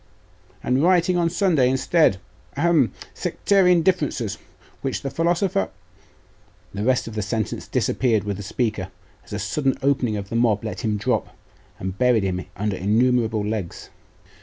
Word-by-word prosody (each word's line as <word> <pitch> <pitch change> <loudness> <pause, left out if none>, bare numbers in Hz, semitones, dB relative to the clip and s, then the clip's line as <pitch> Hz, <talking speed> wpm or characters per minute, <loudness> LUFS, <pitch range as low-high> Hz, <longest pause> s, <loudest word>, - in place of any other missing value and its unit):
'And 130 +2 +1
rioting 180 +1 +3
on 170 -1 +2
Sunday 165 -8 +2
instead. 130 - +3 0.4
Ahem! 160 -5 +3 0.2
sectarian 180 -4 +2
differences, 145 - 0 0.4
which 135 +1 -3
the 135 - -3
philosopher 170 - +1 1.0
The 100 +1 -3
rest 125 0 +1
of 115 - -6
the 105 - -2
sentence 110 +1 -3
disappeared 115 -5 +1
with 100 -2 -3
the - - -6
speaker, 105 -2 -2 0.4
as - - -17
a 105 - -2
sudden 135 +6 -1
opening 130 -6 +1
of 100 -1 -6
the - - -4
mob 115 -3 +2
let 110 - -4
him 105 -2 0
drop, 100 - -2 0.4
and 95 +1 -5
buried 125 -4 +3
him 90 -1 -2
under 105 0 -1
innumerable 110 +1 +2
legs. 105 -5 -5
120 Hz, 150 wpm, -23 LUFS, 105-155 Hz, 1.0 s, rioting